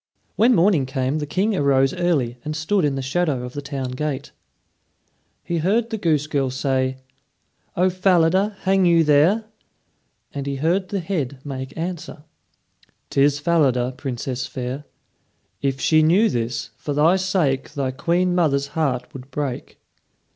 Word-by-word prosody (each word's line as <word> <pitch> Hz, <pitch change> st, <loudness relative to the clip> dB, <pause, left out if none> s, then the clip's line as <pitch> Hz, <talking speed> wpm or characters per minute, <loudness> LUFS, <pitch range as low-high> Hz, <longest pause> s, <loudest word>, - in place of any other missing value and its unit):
When 240 Hz, +2 st, +4 dB
morning 170 Hz, -7 st, +3 dB
came 130 Hz, +2 st, -1 dB
the 150 Hz, -, -4 dB
King 200 Hz, +7 st, 0 dB
arose 135 Hz, -4 st, +3 dB
early 150 Hz, -10 st, 0 dB
and 155 Hz, 0 st, -4 dB
stood 160 Hz, +3 st, +1 dB
in 140 Hz, -2 st, 0 dB
the 135 Hz, -, -3 dB
shadow 140 Hz, -2 st, 0 dB
of 125 Hz, 0 st, -7 dB
the 145 Hz, -, -5 dB
town 140 Hz, -3 st, -4 dB
gate. 140 Hz, +1 st, -4 dB, 1.1 s
He 170 Hz, -1 st, -2 dB
heard 220 Hz, +8 st, +1 dB
the 220 Hz, -, -1 dB
goose 155 Hz, -5 st, +1 dB
girl 140 Hz, -4 st, 0 dB
say, 130 Hz, 0 st, -1 dB, 0.8 s
"O 180 Hz, +2 st, +4 dB
Falada, 185 Hz, +2 st, +2 dB
hang 190 Hz, -1 st, +3 dB
you 170 Hz, -1 st, +5 dB
there?" 160 Hz, +9 st, +3 dB, 0.9 s
and 140 Hz, -1 st, -4 dB
he 140 Hz, -, -2 dB
heard 175 Hz, +7 st, 0 dB
the 200 Hz, -2 st, -2 dB
head 150 Hz, -7 st, -3 dB
make 130 Hz, 0 st, -6 dB
answer: 165 Hz, -3 st, -5 dB, 0.9 s
"'Tis 140 Hz, +1 st, +3 dB
Falada, 140 Hz, -6 st, +2 dB
Princess 130 Hz, -1 st, -4 dB
fair. 130 Hz, +3 st, -5 dB, 0.8 s
If 135 Hz, -1 st, -1 dB
she 155 Hz, +3 st, +4 dB
knew 185 Hz, +8 st, +4 dB
this, 115 Hz, 0 st, -3 dB
for 145 Hz, +3 st, -4 dB
thy 160 Hz, +5 st, +4 dB
sake 180 Hz, -9 st, 0 dB
Thy 135 Hz, -3 st, -1 dB
queen 175 Hz, +6 st, 0 dB
mother's 140 Hz, -5 st, +1 dB
heart 140 Hz, -6 st, -2 dB
would 130 Hz, 0 st, -10 dB
break." 135 Hz, -2 st, -4 dB
150 Hz, 150 wpm, -22 LUFS, 135-175 Hz, 1.1 s, you